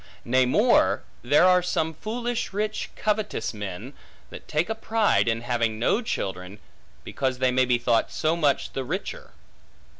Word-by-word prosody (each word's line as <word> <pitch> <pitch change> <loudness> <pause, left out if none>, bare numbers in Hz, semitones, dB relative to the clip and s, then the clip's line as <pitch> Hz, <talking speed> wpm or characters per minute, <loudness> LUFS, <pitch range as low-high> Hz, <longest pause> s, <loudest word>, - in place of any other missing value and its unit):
Nay 130 +1 +3
more, 125 - +3 0.2
there 145 +8 +4
are 180 0 +5
some 160 -2 -1
foolish 235 +6 -3
rich 215 +1 -2
covetous 210 - -1
men, 105 +5 -7 0.4
that - - -11
take 155 +3 0
a 220 - -1
pride, 220 - +1
in 115 0 0
having 120 -2 -1
no 160 - +1
children, 95 - -4 0.5
because 130 -2 -2
they 130 0 +2
may 130 0 +3
be 125 -1 +2
thought 120 -1 +1
so 155 +1 0
much 145 -5 0
the 135 - -3
richer. 195 - -5
140 Hz, 155 wpm, -25 LUFS, -, 0.5 s, are